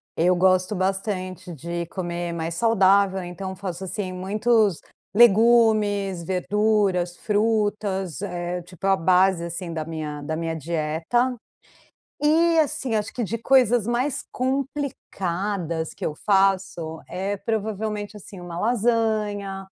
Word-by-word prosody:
Eu 175 +3 +3
gosto 185 +2 +3
bastante 185 -2 -3
de 170 +3 -4
comer 175 -1 -4
mais 165 0 -3
saudável, 195 -2 +3
então 185 +2 -6
faço 185 -1 -6
assim, 190 0 -4
muitos 210 +1 +1 0.3
legumes, 215 -4 +4
verduras, 190 -1 +1
frutas, 205 -4 0
eh, 175 -2 -3
tipo, 180 +1 -10
é - - +4
a 195 - +5
base 185 0 +3
assim 170 0 -5
da 160 -1 -3
minha 155 -2 -5
da 155 +2 -3
minha 165 0 -2
dieta. 165 - -1 0.9
E 325 +2 +4
assim, 295 -6 0
acho 210 - -2
que 245 - -2
de 230 +2 -2
coisas 245 -2 +3
mais 250 +3 0
complicadas 200 - -2
que - - -6
eu 150 - -1
faço, 190 -4 +1
eh, 195 +3 -3
provavelmente 215 -1 -3
assim, 195 -1 -11
uma 175 -1 -6
lasanha, 215 -4 0
195 Hz, 125 wpm, -24 LUFS, 175-220 Hz, 0.9 s, a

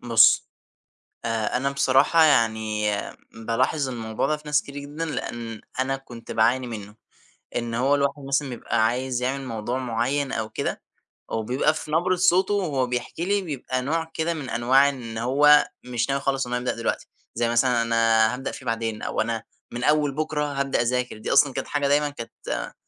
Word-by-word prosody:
بُصّ، 115 -2 +5 0.8
أ 115 0 -1
أنا 135 +2 0
بصراحة 140 +4 +4
يعني 110 -6 +2 0.4
بالاحظ 125 +6 0
الموضوع 110 -3 -2
ده 155 - 0
في 150 - -17
ناس 150 0 +2
كتير 140 - -11
جدًا، 145 +3 -5
لأن 115 -7 -5 0.2
أنا 135 +1 0
كنت 120 -3 -10
باعاني 125 +3 +2
منّه، 105 -3 -7 0.6
إن 120 -1 -2
هو 130 +5 +2
الواحد 140 0 -1
مثلًا 140 0 0
بيبقى 115 -2 0
عايز 125 +2 -1
يعمل 135 +2 -1
موضوع 115 +1 -3
معيّن 130 +3 -1
أو 110 -4 -2
كده، - - -3 0.5
وبيبقى 125 +7 +1
في 155 -1 -7
نبرة 175 +4 +2
صوته 185 +2 +3
وهو 150 -11 0
بيحكي 125 +7 -3
لي 200 +1 +1
بيبقى 135 -6 -3
نوع 160 +4 -2
كده 160 +1 -1
من 150 -5 -6
أنواع 130 +4 +4
إن 120 -5 -6
هو 145 +6 +5 0.2
مش 125 0 -2
ناوي 140 0 0
خالص 135 -2 0
إن 125 - -4
هو 125 - +1
يبدأ 125 - -2
دلوقتي، 115 - -2 0.3
زي 120 0 +1
مثلًا 120 0 +3
أنا 115 -1 +3
هابدأ 130 +2 -4
فيه 130 - -10
بعدين، 115 -2 -2
أو - - -1
أنا 115 0 -2 0.3
من 120 +1 -4
أوّل 150 -1 +2
بكرة 155 0 -1
هابدأ 135 -2 0
أذاكر. 125 0 -1
دي 110 - -2
أصلًا 140 -1 +5
كانت - - -4
حاجة 145 -1 0
دايمًا 145 +1 +2
كانت 115 -5 -6
130 Hz, 180 wpm, -24 LUFS, 115-145 Hz, 0.8 s, بُصّ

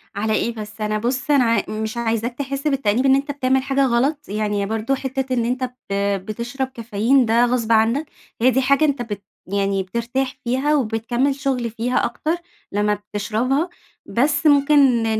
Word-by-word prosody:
على 215 +2 0
إيه 235 +1 0
بس، 215 0 -8
أنا 215 0 0
بُص 255 +6 -1
أنا 275 -3 +5
أ - - -2
مش 220 +2 -3
عايزاك 230 +1 -1
تحس 275 +1 -3
بالتأنيب 260 -3 +1
إن 270 0 +6
أنت 280 +1 -1
بتعمل 265 -1 +1
حاجة 275 0 +2
غلط، 265 +4 0
يعني 210 -1 -1
برضو 225 +5 -1
حِتّة 265 -1 -3
إن 235 -2 +1
أنت 250 +2 -1 0.3
ب 195 - +1 0.3
بتشرب 240 +5 -3
كافيين 235 +1 +1
ده 230 +2 +4
غصب 240 -2 0
عنك، 230 +7 +3 0.4
هي 255 +2 +5
دي 265 +2 +2
حاجة 280 +4 +3
أنت 280 -4 0
بت 205 -4 -5 0.2
يعني 195 0 0
بترتاح 235 +7 -2
فيها 265 +5 +1
وبتكمل 240 +2 0
شُغل 265 -4 -1
فيها 235 +3 0
أكتر 320 +2 -1 0.4
لمّا 210 +1 +1
بتشربها، 220 - -1 0.4
بس 285 +5 +1
ممكن 290 0 +5 0.3
ن 220 -1 0
240 Hz, 175 wpm, -21 LUFS, 220-270 Hz, 0.4 s, إن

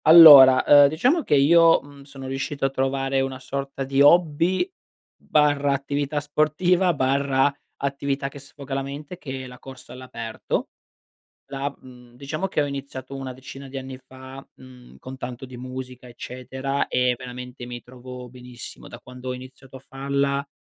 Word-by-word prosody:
Allora, 145 -6 +10
uhm, 145 -1 +8
diciamo 245 - +1
che 150 - +1
io, 165 +4 +6
mhmm, 140 0 -15
sono 135 -1 -11
riuscito 135 +1 -3
a 135 - 0
trovare 135 0 -1
una 135 0 -3
sorta 135 +1 -5
di 135 +1 +1
hobby, 170 - +4 0.5
barra, 145 -2 +1
attività 140 +2 -2
sportiva, 155 +5 +1
barra, 135 0 +1 0.2
attività 140 0 -2
che 140 +1 -10
sfoga 140 0 -10
la 135 - -1
mente, 145 +5 -8
che 130 -2 -6
è - - -8
la 125 0 -13
corsa 130 -2 -12
all'aperto. 115 -3 -5 0.8
La 140 0 -3
mhmm, 125 -1 -16
diciamo 155 +8 -4
che 185 - -1
ho - - +1
iniziato 135 -1 -7
una 130 -1 -6
decina 135 +2 -11
di 135 +1 -8
anni 130 0 -7
fa, 130 +1 -12
mhmm, 125 -1 -16
con 130 +1 -9
tanto 125 0 -7
di 125 -1 -11
musica, 130 0 -8
eccetera, 130 +3 -4
e 125 -1 +1
veramente 125 0 -9
mi 120 0 -8
trovo 125 0 -11
benissimo. 125 0 -11
Da - - -10
quando 125 +1 -10
ho - - -2
iniziato 130 +1 -12
a - - -9
farla, 140 +1 -2
135 Hz, 165 wpm, -23 LUFS, 130-140 Hz, 0.8 s, Allora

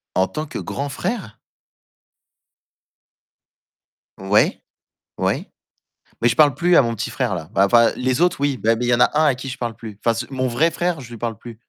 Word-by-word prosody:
En 95 - +3
tant 155 - -5
que - - -6
grand 140 +1 -4
frère? 140 - -4 2.8
Ouais, 95 +2 +2 0.6
ouais, - - -1 0.7
mais 120 - +4
je 115 - +1
parle 150 -3 +5
plus 175 0 +2
à - - +7
mon 115 -2 -2
petit - - -3
frère - - -1
là 80 - -7
bah 100 - +4
enfin 115 +3 +5
les 130 +2 -1
autres 175 -4 +2
oui, 140 -5 0
mais 115 +1 +4
il 125 - 0
y 120 - +3
en - - +1
a - - +5
un 155 - +4
à 140 - +3
qui 135 +1 -7
je 130 +1 -6
parle 115 -3 -4
plus. 110 -3 -9
Enfin 115 - +4
c 120 +1 -4
mon 130 -1 -1
vrai 155 +8 +2
frère 175 -3 -1
je 125 - -10
lui 120 - -9
parle 115 -2 -4
plus. 120 -1 -10
125 Hz, 210 wpm, -21 LUFS, 115-145 Hz, 2.8 s, à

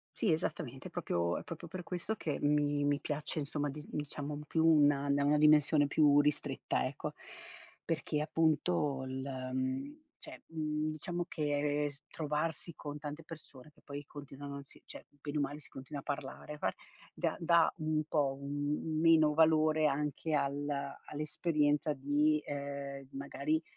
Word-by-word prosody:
Sì, 205 - +2
esattamente. 155 - -2
È - - -15
proprio 85 0 0
è - - -8
proprio 170 +1 -7
per 180 +2 -6
questo 180 +5 -3
che 150 -7 -2
mi 145 0 +2
mi 145 0 +2
piace, 150 +2 -3
insomma, 145 0 -1
di 150 +2 -8
diciamo 145 0 -4
più 160 +2 +2
una 145 -3 +5
una 145 +1 +3
dimensione 150 0 +6
più 145 0 +5
ristretta, 150 0 0
ecco, - - -3 0.7
perché 150 - -1
appunto 155 -3 +1
il, 130 0 -4 0.3
mhmm 130 - -2 0.2
cioè, - - -10
mhmm, 155 -1 -1
diciamo 175 +3 -3
che 145 -2 0 0.2
trovarsi 155 +2 -2
con 145 0 -6
tante 150 +2 -6
persone 150 -4 -12
che - - -25
poi 145 +1 -7
continuano 140 0 -8
sì, - - -19
cioè, - - -10
bene 145 +1 -5
o - - +2
male 145 +1 -2
si - - -11
continua 135 +2 -7
a - - -32
parlare, 145 +1 -5
parl - - 0 0.4
dà - - -1
dà 170 0 +4
un 155 -1 +1
po' 140 -4 +1
un 145 +1 -2
un 155 -1 -1
meno 160 -2 +6
valore 155 0 +4
anche 150 +2 -1
al 145 0 0 0.4
all'esperienza 150 0 +1
di, 145 +2 +2
ehm, 140 -1 -5
magari, 140 +3 -1
150 Hz, 155 wpm, -34 LUFS, 145-155 Hz, 0.7 s, dimensione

